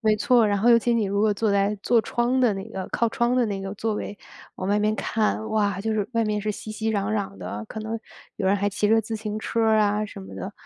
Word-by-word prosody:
没 215 -2 +3
错 240 +2 +4
儿， - - +4
然 205 -1 +1
后 235 +4 +4
尤 235 - +7
其 240 +1 +1
你 225 -2 +2
如 200 +1 0
果 215 -1 +3
坐 220 0 0
在 200 +1 +2
坐 235 -1 +4
窗 240 +3 0
的 240 -4 +4
那 195 +3 -6
个 190 -4 -6
靠 235 - +2
窗 235 +2 +1
的 250 - +3
那 200 -2 -3
个 195 +1 -5
座 220 +1 -2
位， 205 0 -5 0.4
往 185 - -4
外 205 +1 +3
面 215 +1 +1
看。 220 0 -1
哇， 205 -3 +1
就 220 +1 -1
是 210 -2 -1
外 230 -1 +1
面 210 -1 -1
是 215 - -1
熙 215 - -8
熙 220 +1 -2
攘 200 +1 -1
攘 200 -2 -2
的， 105 +1 -6
可 220 - -6
能 220 +1 -4 0.4
有 190 - -2
人 200 +1 +4
还 200 +1 0
骑 205 +1 0
着 225 +1 +5
自 220 +1 -5
行 215 -1 -4
车 230 +1 -2
儿 220 -1 +4
啊 210 +1 +2
什 200 - -10
么 95 0 -10
的， 95 - -6
215 Hz, 305 characters per minute, -24 LUFS, 200-225 Hz, 0.4 s, 尤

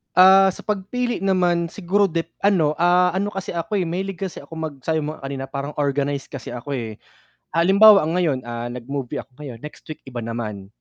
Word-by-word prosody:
Ah, 190 +1 +7
sa - - -11
pagpili 225 +4 -2
naman 175 -3 +2
siguro 200 +3 +1
de 165 -2 0 0.2
ano, 160 -7 +3
ah, 180 +1 +4
ano 205 +2 -1
kasi 195 -1 -5
ako 180 +4 -1
mahilig 185 +2 -3
kasi 190 -4 -4
ako 165 - -13
mag 160 -2 -4
sabi 160 -1 +1
mo 155 +1 -4
nga 135 - -10
kanina 135 -1 -5
parang 140 +1 -4
organize 140 -1 -1
kasi 135 - -7
ako 125 +4 -8
eh. 110 -3 -6 0.5
Ah, 165 - +4
halimbawa 200 +1 +7
ang 165 +4 0
ngayon, 145 -8 +1
ah, 120 0 -5
nag-movie 125 +2 -5
ako 135 - -25
ngayon, 130 -6 -9
next 150 - -10
week 155 - -8
iba 125 -3 -8
naman. 110 -4 -5
160 Hz, 200 wpm, -22 LUFS, 135-190 Hz, 0.5 s, Ah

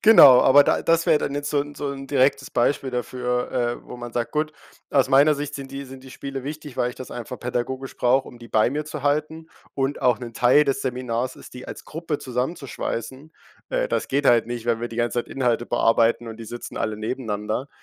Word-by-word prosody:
Genau, 140 - +9
aber 140 +2 +7
da - - +2
das 165 0 +2
wäre 150 - +5
dann 140 - -3
jetzt 145 0 -3
so 145 - +2
'n 145 0 -6
so 145 -1 -3
'n 135 0 -8
direktes 135 0 +2
Beispiel 130 +2 +1
dafür, 125 0 -2
äh, 120 -1 -2
wo - - -8
man 120 -1 -8
sagt, 120 -1 -2
gut, 155 0 -1 0.4
aus 135 -2 +3
meiner 145 +3 +5
Sicht 145 0 -5
sind 135 -1 -7
die 140 0 -6
sind 130 0 -11
die 130 - -12
Spiele 135 0 -6
wichtig, 150 -1 -7
weil 120 - +1
ich 125 - -8
das 130 - -8
einfach 120 +1 -6
pädagogisch 125 +2 -4
brauche, 130 +2 +2
um 120 - -12
die 120 0 -12
bei 110 +1 +3
mir 150 +2 -2
zu 150 -2 -7
halten 155 +2 -1 0.3
und 135 +1 -1
auch 125 -1 +3
'n 120 -2 -7
Teil 130 +5 +5
des 135 -2 -1
Seminars 125 -1 -2
ist - - -13
die 125 - -9
als - - -8
Gruppe 160 -2 -4
zusammenzuschweißen. 130 +1 -4 0.4
Äh, - - 0
das - - -1
geht 140 +1 +1
halt 120 -1 +5
nicht, 120 -1 -5
wenn 115 -1 +1
wir 120 - -3
die 115 - -9
ganze 120 0 0
Zeit - - -21
Inhalte 120 -3 0
bearbeiten 115 0 +2
und 110 -1 -7
die 115 - -7
sitzen 120 +2 -8
alle 110 -1 -2
nebeneinander. 110 +2 -3
130 Hz, 230 wpm, -23 LUFS, 120-145 Hz, 0.4 s, Genau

